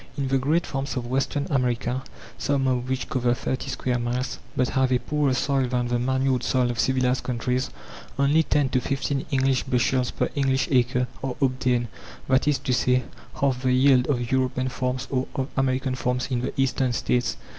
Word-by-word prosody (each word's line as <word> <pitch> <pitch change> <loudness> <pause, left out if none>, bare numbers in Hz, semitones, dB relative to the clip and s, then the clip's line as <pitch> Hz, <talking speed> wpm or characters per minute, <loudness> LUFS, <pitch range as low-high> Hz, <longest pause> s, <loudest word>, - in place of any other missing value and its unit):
In 135 -2 -1
the 135 0 +2
great 155 +6 +1
farms 135 -2 -3
of 120 - -3
Western 135 +3 -1
America, 125 -1 0 0.3
some 140 -1 0
of 125 -1 0
which 130 -1 -2
cover 125 -2 +1
30 130 +2 -3
square 125 -1 -1
miles, 120 +1 -2 0.2
but 125 -1 +2
have 130 0 +1
a 125 - +4
poorer 145 0 0
soil 135 -1 +1
than 125 -1 -1
the 120 0 +1
manured 130 0 +1
soil 125 -1 +1
of 120 - -6
civilized 130 -1 +1
countries, 125 +1 -1 0.5
only 140 +3 +4
10 145 -3 +1
to 130 -1 +1
15 135 +1 -2
English 135 -2 +2
bushels 125 0 +1
per - - -1
English 135 -1 +1
acre 125 -1 +2 0.2
are 135 -2 -2
obtained; 125 -3 +1 0.4
that 130 +2 +2
is 145 -2 +3
to 130 - -2
say, 125 0 +2 0.4
half 135 -3 +1
the 130 -1 +2
yield 130 -1 +4
of 120 -4 -1
European 130 0 +1
farms 125 0 -2
or 130 -1 0
of 135 +1 -2
American 130 0 0
farms 125 0 -1
in 120 -2 0
the - - -2
Eastern 130 -1 +1
States. 125 +1 0
130 Hz, 190 wpm, -25 LUFS, 125-135 Hz, 0.5 s, a